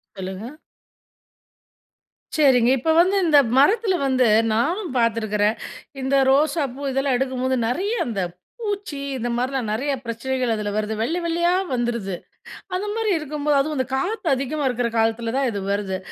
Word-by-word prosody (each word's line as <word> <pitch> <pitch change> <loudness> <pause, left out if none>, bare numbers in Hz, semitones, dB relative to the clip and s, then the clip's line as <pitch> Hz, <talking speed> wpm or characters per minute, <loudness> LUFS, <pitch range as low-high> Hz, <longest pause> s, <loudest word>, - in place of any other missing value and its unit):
சொல்லுங்க. 190 +3 -6 1.9
சரிங்க. 255 -6 +4
இப்ப 320 +6 +1
வந்து 380 +3 +2
இந்த 300 -3 +6 0.2
மரத்ல 395 - +4
வந்து 255 -2 +3 0.3
நானும் 335 - 0
பார்த்துக்றேன். 220 -2 +1 0.5
இந்த 265 +1 +1 0.2
ரோசாப்பூ 285 -2 +1
இதெல்லாம் 270 -1 +1
எடுக்கும்போது, 260 0 -1
நறைய 380 - -1
அந்த 215 -5 -2 0.4
பூச்சி, 405 -9 -3 0.2
இந்த 240 0 -3
மாரிலாம் 250 -2 -1
நறைய 270 +7 -1
பிரச்சனைகள் 245 +1 -1
அதுல 210 -1 -3
வருது 215 0 -1
வெள்ளை 330 +10 0
வெள்ளையா 345 +1 +1 0.2
வந்துருது. 235 -6 -2 0.6
அந்த 395 +3 -2
மாரி 450 -2 0
இருக்கும்போது, 300 -1 -1
அதுவும் 305 +1 -1
அந்த 260 - 0
காத்து 390 +6 -2
அதிகமா 275 +3 -3
இருக்க 245 -1 -1
காலத்ல 225 +1 0
தான் 270 -2 +1
இது 200 -2 -4
வருது. 195 -2 -2
260 Hz, 140 wpm, -22 LUFS, 230-305 Hz, 1.9 s, இந்த